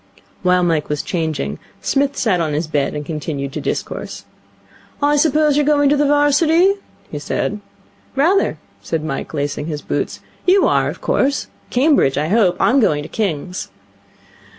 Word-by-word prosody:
While 180 Hz, 0 st, +3 dB
Mike 165 Hz, -4 st, 0 dB
was 150 Hz, -1 st, -2 dB
changing, 155 Hz, -, -2 dB, 0.2 s
Psmith 280 Hz, +4 st, 0 dB
sat 190 Hz, -7 st, +1 dB
on 155 Hz, -2 st, -1 dB
his 155 Hz, +3 st, -1 dB
bed, 150 Hz, -3 st, -1 dB
and 150 Hz, 0 st, -4 dB
continued 145 Hz, -3 st, -4 dB
to -, -, -4 dB
discourse. -, -, -4 dB, 0.7 s
'I 290 Hz, 0 st, +3 dB
suppose 300 Hz, 0 st, +3 dB
you're 295 Hz, -, +3 dB
going 290 Hz, -1 st, +3 dB
to 290 Hz, -, +4 dB
the 290 Hz, 0 st, +2 dB
'Varsity?' 315 Hz, +6 st, +4 dB, 0.3 s
he 150 Hz, -, -4 dB
said. 205 Hz, +7 st, -2 dB, 0.6 s
'Rather,' 340 Hz, +9 st, +2 dB, 0.2 s
said 160 Hz, -1 st, -3 dB
Mike, 135 Hz, -3 st, -4 dB
lacing 145 Hz, +1 st, -2 dB
his 150 Hz, -2 st, -4 dB
boots. -, -, -3 dB, 0.3 s
'You 380 Hz, +2 st, +5 dB
are, -, -, +2 dB
of -, -, -8 dB
course? 280 Hz, +1 st, 0 dB, 0.2 s
Cambridge, 260 Hz, -, +3 dB
I 150 Hz, +2 st, 0 dB
hope. 195 Hz, -4 st, +3 dB
I'm 265 Hz, +4 st, +4 dB
going 150 Hz, -, +2 dB
to -, -, -9 dB
King's.' 180 Hz, -3 st, -3 dB
185 Hz, 160 wpm, -19 LUFS, -, 0.7 s, You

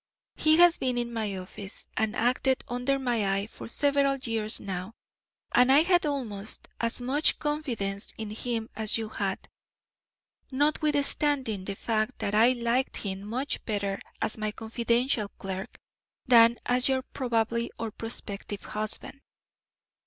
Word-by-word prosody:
He 310 Hz, 0 st, +4 dB
has 350 Hz, 0 st, +6 dB
been 250 Hz, -2 st, 0 dB
in 240 Hz, 0 st, -2 dB
my 215 Hz, -4 st, -2 dB
office 190 Hz, +2 st, -8 dB
and 220 Hz, 0 st, 0 dB
acted 255 Hz, +3 st, +1 dB
under 250 Hz, +3 st, 0 dB
my 230 Hz, -7 st, +1 dB
eye 200 Hz, +1 st, -1 dB
for 220 Hz, -, -10 dB
several 280 Hz, +2 st, +2 dB
years 225 Hz, -4 st, 0 dB
now, 190 Hz, +2 st, -5 dB, 0.6 s
and 250 Hz, +1 st, +5 dB
I 280 Hz, +3 st, +7 dB
had 350 Hz, -2 st, +3 dB
almost 220 Hz, -8 st, -4 dB
as 230 Hz, +1 st, +1 dB
much 270 Hz, +5 st, +2 dB
confidence 235 Hz, -10 st, -2 dB
in 220 Hz, -2 st, -5 dB
him 225 Hz, 0 st, -2 dB
as 220 Hz, 0 st, +2 dB
you 220 Hz, -1 st, -4 dB
had, 200 Hz, -2 st, -3 dB, 1.0 s
notwithstanding 285 Hz, -6 st, +1 dB
the 200 Hz, -, -3 dB
fact 220 Hz, +3 st, -1 dB
that 200 Hz, -, -2 dB
I 230 Hz, +4 st, +6 dB
liked 240 Hz, +1 st, 0 dB
him 195 Hz, -2 st, -3 dB
much 250 Hz, +7 st, -3 dB
better 200 Hz, -2 st, -2 dB, 0.2 s
as 215 Hz, -, 0 dB
my 215 Hz, 0 st, -1 dB
confidential 235 Hz, 0 st, 0 dB
clerk 190 Hz, 0 st, -6 dB, 0.5 s
than 235 Hz, -1 st, +7 dB
as 250 Hz, +1 st, +3 dB
your 260 Hz, -1 st, +1 dB
probable 235 Hz, -3 st, -1 dB
or 225 Hz, -1 st, -4 dB
prospective 205 Hz, -2 st, -6 dB
husband. 215 Hz, +6 st, -3 dB
230 Hz, 140 wpm, -28 LUFS, 210-265 Hz, 1.0 s, I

